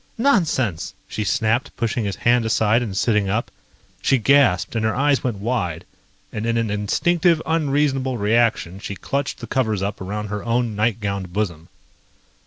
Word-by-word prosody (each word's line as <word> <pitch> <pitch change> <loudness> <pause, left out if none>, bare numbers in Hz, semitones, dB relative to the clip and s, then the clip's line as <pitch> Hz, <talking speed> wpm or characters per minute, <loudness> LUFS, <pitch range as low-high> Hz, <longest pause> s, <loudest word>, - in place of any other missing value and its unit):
"Nonsense!" 165 - +1
she 110 - -3
snapped, 115 +3 0
pushing 115 -1 -1
his 100 - -2
hand 120 0 +2
aside 110 +1 +2
and 105 -5 -4
sitting 105 -3 +2
up. 110 +4 -1 0.5
She 135 - +3
gasped 125 -6 +3
and 110 - 0
her 110 0 +1
eyes 140 +1 +2
went 120 -5 -1
wide, 100 -7 -2 0.5
and 110 +1 -3
in 115 0 +1
an 115 -2 0
instinctive, 165 - +2
unreasonable 140 -5 +1
reaction 105 -4 +1
she 100 - -6
clutched 140 +5 -3
the - - -5
covers 110 -7 0
up 100 -1 -3
around 105 +2 -4
her 105 0 -4
own 115 -1 0
nightgowned 100 -4 -1
bosom. 85 -6 -3
115 Hz, 160 wpm, -21 LUFS, 105-130 Hz, 0.5 s, She